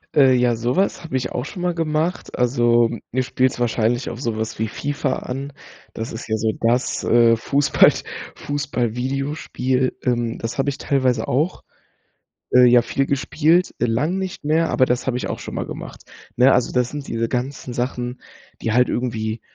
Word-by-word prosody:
Äh, 135 -3 +6
ja, 125 -1 +3
so 120 +2 -1
was 195 -2 0
habe 145 -5 -2
ich 130 - -3
auch - - -2
schon 180 +1 -7
mal 180 -1 0
gemacht. 160 +2 -2
Also, 120 -2 +3 0.2
du 130 +2 +1
spielst 130 0 0
wahrscheinlich 120 0 0
auf 120 +2 -7
so 115 -4 -2
was 110 0 -3
wie 110 - -1
FIFA 145 +6 -2
an. 135 +3 -6 0.4
Das 115 +1 -5
ist 115 - -7
ja 110 - +1
so 110 0 +1
das, 120 +3 +1
äh, 115 -1 +5
Fußball 140 +5 +4 0.4
Fußball-Videospiel. 130 -1 -2
Ähm, 120 -2 0
das 115 +3 -4
habe 135 +1 +1
ich 135 - -4
teilweise 130 -5 0
auch, 150 +8 0 0.9
äh, 125 0 +7
ja, 120 0 +6
viel 135 +4 -1
gespielt, 160 +6 +2
äh, - - +2
lang 145 +11 0
nicht 190 -5 -5
mehr, 160 +2 +2
aber 130 - +3
das 125 +1 -1
habe 125 - 0
ich - - -3
auch - - -4
schon - - -7
mal - - -2
gemacht. - - -9 0.3
Ne, 130 +2 +6
also 125 - +2
das 125 -1 +1
sind 145 -2 -7
diese 115 0 -1
ganzen 125 +1 -4
Sachen, 125 0 -3 0.4
die 110 - -1
halt 125 +2 +4
irgendwie, 110 -2 -2
125 Hz, 185 wpm, -21 LUFS, 120-140 Hz, 0.9 s, äh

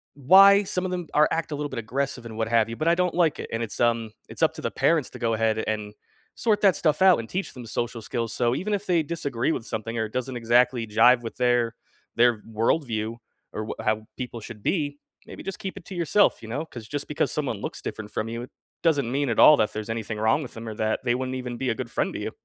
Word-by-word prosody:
why 195 +8 +7
some 185 -1 -2
of 185 - -2
them 175 -2 -3
are 150 0 +5
act 165 -1 -2
a - - -1
little 145 0 -3
bit 130 - -4
aggressive 135 +3 -3
and 110 -2 -8
what 110 - 0
have 115 -1 +2
you, 115 - -5
but 155 - -2
I 170 - +5
don't 180 -1 0
like 170 -3 +2
it, - - -6
and 115 - -1
it's, 115 -3 -5
um, 115 -2 +1 0.2
it's - - -9
up - - +4
to - - -7
the - - -2
parents 160 -5 +1
to - - -10
go 115 -1 0
ahead 110 0 +1
and 105 -1 -3 0.4
sort 215 -3 +1
that 195 -5 +5
stuff 155 +2 +1
out 185 -2 +6
and 115 - -6
teach 190 +2 -3
them 125 -3 -9
social 115 +1 -3
skills, 115 +1 -3
so 120 0 +1
even 200 +8 -2
if 205 0 -2
they 175 -4 +2
disagree 145 -5 -2
with 115 - -3
something 115 +2 -4
or 110 - 0
it 110 - -10
doesn't 130 0 -3
exactly 120 0 +2
jive 120 +3 +5
with 115 - -7
their 120 -2 +2 0.4
their 120 -1 +4
worldview 115 0 -1 0.4
or 110 - -3
w - - -4
how 110 0 0
people 125 -2 -5
should 105 -1 -10
be, 145 -5 -1 0.3
maybe - - -9
just 195 -1 -6
keep 190 - -5
it 195 - -9
to 190 - -8
yourself, 175 +4 +2
you 110 - -9
know? 145 +8 -3
'Cause 120 -8 -10
just 145 -1 -4
because 150 - -1
someone 140 -7 -2
looks - - -5
different 105 -1 -6
from 110 - -2
you, 120 +2 -5 0.4
doesn't 145 -7 +2
mean 140 0 0
at 115 - 0
all 155 - +9
that 105 - +1
there's 110 0 -5
anything 110 -1 -3
wrong 110 +7 +2
with 135 - -8
'em 115 0 -7
or 110 - -4
that 110 0 0
they 120 -1 +2
wouldn't 130 0 -3
even 125 -1 -5
be 130 +1 -1
a 115 - 0
good 120 0 -5
friend - - -1
to - - -4
you. - - -4
120 Hz, 265 wpm, -25 LUFS, 115-155 Hz, 0.4 s, all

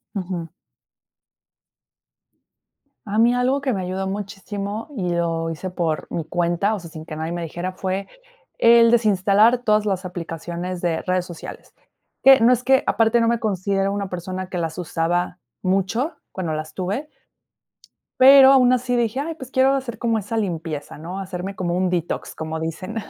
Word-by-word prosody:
Ujú. 180 -4 -4 2.6
A 210 +1 -2
mí 235 +2 +5
algo 255 +3 +1
que 275 -2 -1
me 195 -4 -2
ayudó 185 +1 -3
muchísimo, 200 +2 -5
y 185 -5 -2
lo 165 -1 -1
hice 165 +3 -5
por 170 -4 -2
mi 165 - -3
cuenta, 175 +5 0
o 210 - -4
sea, 170 -1 -11
sin 155 0 -10
que 155 - -7
nadie 160 +2 -3
me 175 0 -3
dijera, 175 +3 -4
fue 190 +1 -3 0.5
el 230 0 +6
desinstalar 215 +1 +4
todas 215 -1 +2
las 190 -2 -1
aplicaciones 175 0 -5
de 170 -2 0
redes 185 -1 0
sociales. 175 -2 -10 0.5
Que 270 0 +8
no 235 +2 +6
es 250 -1 +1
que 265 +1 +3
aparte, 225 +1 +3
no 230 - +2
me 235 0 +1
considero 195 -1 0
una 200 -1 -3
persona 185 +1 -5
que 180 - -3
las 165 -2 -3
usaba 175 +1 -1 0.2
mucho 195 - 0 0.2
cuando 170 -4 -3
las 155 0 -5
tuve 200 +11 -3 1.1
pero 270 +1 +9
aún 255 -2 +5
así 245 0 0
dije: 235 +1 0
"Ay, 325 +3 -3
pues 260 -5 -10
quiero 265 +1 +3
hacer 260 -4 -3
como 230 -1 0
esa 215 +2 -4
limpieza", 165 -9 -4
¿no? 175 +5 -6
Hacerme 190 0 -5
como 175 -2 -2
un 185 +1 +1
detox, 175 -2 -3
como 160 0 -5
dicen. 165 +7 -5
190 Hz, 170 wpm, -22 LUFS, 175-230 Hz, 2.6 s, pero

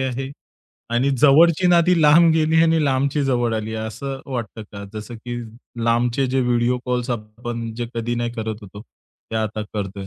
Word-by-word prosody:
आहे. 130 +1 -3 0.6
आणि 125 +4 +2
जवळची 160 +5 +5
नाती 175 0 +4
लांब 165 +3 +6
गेली 160 0 +3
आणि 165 -2 +3
लांबची 140 +2 +1
जवळ 120 -3 +1
आली 110 0 -3
आहे, 110 0 -3
असं 135 +4 -6
वाटतं 115 -2 -5
का? 100 -1 -7
जसं 110 +3 -7
की 120 +2 -6 0.5
लांबचे 120 +3 +1
जे 130 +1 0
व्हिडिओ 120 0 +1
कॉल्स 125 0 -2
आपण 115 +1 -5
जे 120 +1 -4
कधी 115 +1 -2
नाही 120 0 -2
करत 110 -2 -5
होतो, 100 +1 -11
ते 115 - -12
आता 110 -1 -2
करतोय. 100 -1 -4
120 Hz, 175 wpm, -21 LUFS, 110-135 Hz, 0.6 s, लांब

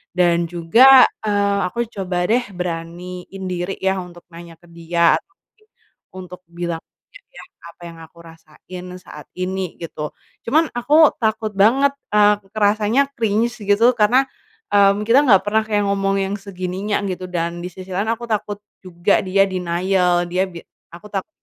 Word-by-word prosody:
Dan 170 -1 +2
juga, 230 +11 +6 0.2
eee, 200 -1 +1
aku 235 +6 -2
coba 180 -3 -3
deh 240 - +4 0.2
beraniin 180 +2 -6
diri 180 +2 -3
ya, 190 0 +1
untuk 175 -1 -11
nanya 170 0 -12
ke 165 - -39
dia, 170 0 +1
atau - - -35 0.2
mungkin 430 0 -34 0.5
untuk 180 -1 -9
bilang 170 -1 -5 0.3
ke - - -14
dia - - -13 0.2
apa 170 +1 -16
yang 165 - -14
aku 160 +1 -15
rasain 165 +2 -12
saat 180 - -12
ini, 185 -1 -4
gitu. 150 -2 -6 0.3
Cuman 310 +5 +2
aku 290 +6 +4
takut 220 -1 -1
banget, 230 +8 +3 0.2
eee, 210 0 +5 0.2
kerasanya 215 +6 +2
cringe 225 +1 0
gitu 205 +4 +3
karena, 240 +3 +3 0.5
mmm, 200 0 +4
kita 240 +4 +6
nggak 195 -5 +5
pernah 220 +1 +1
kayak 210 -1 +1
ngomong 195 0 0
yang 195 +1 -3
segininya 195 +1 -4
gitu 185 0 -6
dan, 170 -1 -3
di - - -4
sisi 185 +1 -11
lain 200 +4 -2
aku 235 +1 -4
takut 205 -1 -2 0.2
juga 185 +1 0
dia 195 +1 +3
denial, 180 0 0
dia 185 +1 +1
bi 170 -2 -10 0.4
aku 175 +5 -12
takut 195 -2 -3
190 Hz, 160 wpm, -20 LUFS, 175-210 Hz, 0.5 s, juga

